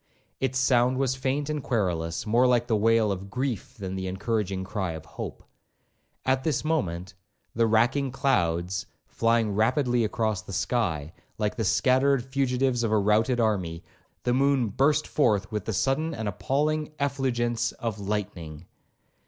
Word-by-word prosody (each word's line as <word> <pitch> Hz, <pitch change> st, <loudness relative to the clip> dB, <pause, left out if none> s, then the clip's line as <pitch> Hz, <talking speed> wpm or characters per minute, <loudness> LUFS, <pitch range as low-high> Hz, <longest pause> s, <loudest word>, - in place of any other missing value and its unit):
Its 130 Hz, -1 st, 0 dB
sound 130 Hz, -1 st, +3 dB
was 135 Hz, -1 st, +1 dB
faint 135 Hz, +2 st, -1 dB
and 150 Hz, -1 st, -2 dB
querulous, 85 Hz, -10 st, -1 dB
more 120 Hz, +4 st, +4 dB
like 120 Hz, -1 st, +3 dB
the 115 Hz, -2 st, +1 dB
wail 110 Hz, 0 st, +3 dB
of 100 Hz, 0 st, -5 dB
grief, 125 Hz, +1 st, -3 dB
than 95 Hz, -3 st, -5 dB
the 95 Hz, 0 st, -3 dB
encouraging 95 Hz, 0 st, -2 dB
cry 95 Hz, -3 st, -3 dB
of 80 Hz, -2 st, -8 dB
hope. -, -, -7 dB, 0.8 s
At 130 Hz, 0 st, +1 dB
this 155 Hz, -2 st, 0 dB
moment, 95 Hz, -, -1 dB, 0.4 s
the 115 Hz, 0 st, +2 dB
racking 120 Hz, +5 st, +2 dB
clouds 95 Hz, -, 0 dB, 0.2 s
flying 115 Hz, -2 st, +1 dB
rapidly 120 Hz, +3 st, +2 dB
across 110 Hz, -2 st, -1 dB
the 95 Hz, +2 st, -9 dB
sky, 85 Hz, -, -1 dB, 0.2 s
like 105 Hz, -1 st, -1 dB
the 115 Hz, -, -1 dB
scattered 130 Hz, +4 st, +3 dB
fugitives 130 Hz, -2 st, 0 dB
of 115 Hz, -, 0 dB
a 110 Hz, -, +4 dB
routed 110 Hz, +4 st, +2 dB
army, 90 Hz, -7 st, 0 dB, 0.4 s
the 125 Hz, -, +1 dB
moon 135 Hz, -3 st, +2 dB
burst 145 Hz, +8 st, +2 dB
forth 105 Hz, -9 st, +1 dB
with 105 Hz, -3 st, -3 dB
the -, -, -2 dB
sudden 150 Hz, -, 0 dB
and 110 Hz, -4 st, -4 dB
appalling 150 Hz, +9 st, -1 dB
effulgence 120 Hz, -4 st, 0 dB
of 115 Hz, -3 st, -4 dB
lightning. 95 Hz, -6 st, -4 dB
115 Hz, 155 wpm, -26 LUFS, 100-130 Hz, 0.8 s, more